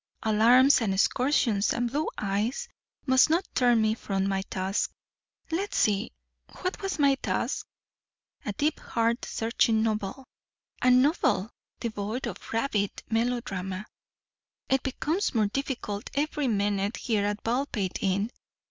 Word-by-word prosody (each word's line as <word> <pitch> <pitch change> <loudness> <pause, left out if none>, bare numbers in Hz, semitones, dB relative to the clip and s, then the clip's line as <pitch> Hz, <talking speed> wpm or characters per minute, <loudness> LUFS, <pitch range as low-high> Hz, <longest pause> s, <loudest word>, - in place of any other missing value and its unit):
"Alarms 240 +6 +5
and 195 -4 0
excursions 230 -1 +2
and 240 0 -1
blue 300 +4 0
eyes 210 - -1 0.4
must 260 +1 +5
not 340 +4 +2
turn 245 -2 +4
me 215 0 +2
from 195 -3 -2
my 195 -1 0
task. 190 +2 -1 0.6
Let's 385 +5 -1
see 210 +2 +2 0.5
what 365 +1 -3
was 390 -3 -2
my 280 -2 +4
task? - - -2 0.8
A - - -2
deep 290 +8 0
heart 230 +1 0
searching 225 -1 +1
novel, 215 +3 -2 0.6
a 255 - +4
novel 250 - +3 0.3
devoid 220 +1 -3
of - - -7
rabid 225 -4 +1 0.2
melodrama. 215 -5 -1 0.8
It 265 0 +3
becomes 305 +6 -1
more 220 -2 +3
difficult 215 -2 -3
every 295 -1 0
minute 205 -1 0
here 215 -4 0
at 205 0 -2
Baldpate 230 -6 -1
Inn. 200 +4 0
230 Hz, 130 wpm, -27 LUFS, 205-265 Hz, 0.8 s, Alarms